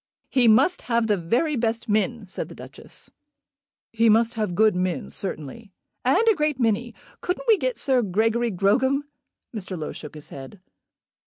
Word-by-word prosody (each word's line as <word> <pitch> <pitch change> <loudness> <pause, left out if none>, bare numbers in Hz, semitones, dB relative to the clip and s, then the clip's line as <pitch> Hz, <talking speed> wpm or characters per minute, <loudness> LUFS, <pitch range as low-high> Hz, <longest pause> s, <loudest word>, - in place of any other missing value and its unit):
"He 255 -3 +4
must 265 +12 +4
have 235 -1 0
the 210 -2 +2
very 235 - 0
best 230 -1 -1
men," 215 +1 0
said 185 - -5
the - - -11
Duchess. - - -10 0.8
"He 230 0 +4
must 225 +2 +4
have 210 -6 -2
good 215 0 +4
men, 180 -5 -2
certainly." 195 +3 -5 0.3
"And 455 - +3
a 445 - +7
great 300 -6 -1
many. 235 0 0 0.3
Couldn't 360 +7 -3
we 450 - +7
get 255 - -2
Sir 255 +1 +2
Gregory 225 +4 +1
Grogram?" 255 +9 +2 0.5
Mr. 190 -3 -5
Low 155 - -4
shook 150 0 -10
his 150 - -10
head. 135 +8 -10
225 Hz, 165 wpm, -24 LUFS, 195-250 Hz, 0.8 s, a